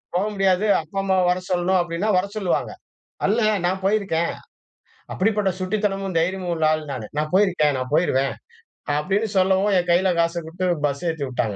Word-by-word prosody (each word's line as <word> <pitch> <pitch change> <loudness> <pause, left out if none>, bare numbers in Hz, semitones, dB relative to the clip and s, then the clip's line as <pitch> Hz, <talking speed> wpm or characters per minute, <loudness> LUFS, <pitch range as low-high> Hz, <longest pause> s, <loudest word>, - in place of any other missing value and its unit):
போக 185 - +1
முடியாது. 195 0 +2 0.2
அப்பா, 160 +5 -5
அம்மா 190 -1 +1
வர 180 +1 +1
சொல்லணும் 180 +1 +2
அப்படின்னா 175 +4 -3
வர 185 - +1
சொல்லுவாங்க. 190 -4 -1 0.5
அல்ல 220 +4 +2 0.2
நான் 190 +1 -1
போயிருக்கேன். 195 -5 +1 0.8
அப்படிப்பட்ட 205 0 +1
சுட்டித்தனமும் 195 -1 -2
தைரியமும் 180 +1 -1
உள்ள 160 -1 -1
ஆள் 155 0 -2
நானு. 120 -5 -5
"நான் 155 +2 -2
போயிருக்கேன் 180 -7 +3
நான் 130 0 -4
போய்ருவேன்" 135 -5 +2 0.7
அப்படின்னு 195 +8 0
சொல்லவும் 190 +2 +3
என் 180 0 0
கையில 185 +2 +3
காச 170 +1 +1
குடுத்து 175 +3 -4 0.2
பஸ் 140 +5 -4
ஏத்திவிட்டாங்க. 130 -8 -3
180 Hz, 155 wpm, -22 LUFS, 160-195 Hz, 0.8 s, போயிருக்கேன்